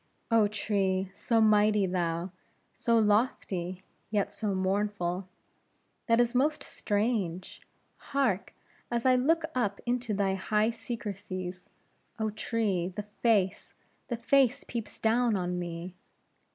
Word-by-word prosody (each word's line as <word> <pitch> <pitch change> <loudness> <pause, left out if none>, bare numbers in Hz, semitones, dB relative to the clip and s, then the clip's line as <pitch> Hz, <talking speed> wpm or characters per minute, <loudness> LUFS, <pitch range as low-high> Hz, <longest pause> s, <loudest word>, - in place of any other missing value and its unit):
Oh, 225 -2 +5
tree! 195 -2 0
so 225 +3 +1
mighty 210 -1 +4
thou, 175 -1 -1 0.4
so 235 -1 +2
lofty, 205 -5 +1 0.3
yet 205 -1 0
so 205 -3 -1
mournful! 190 -1 -1 0.8
This 235 0 +4
is - - -15
most 290 +3 +1
strange! 205 -5 -2 0.4
Hark! 260 -9 -1 0.3
as 235 0 -1
I 260 - +6
look 315 +6 +2
up 205 -6 0
into 240 -3 -1
thy 195 -1 +1
high 210 +3 +1
secrecies, 200 -6 -6 0.5
oh, 220 -1 -1
tree, 210 -5 -1
the 195 +3 -6 0.2
face, 205 -5 +1 0.3
the 240 - -2
face, 270 +2 +3
peeps 230 -3 -6
down 230 0 +2
on 180 -1 -2
me! 175 +1 -5
210 Hz, 120 wpm, -29 LUFS, 185-230 Hz, 0.8 s, I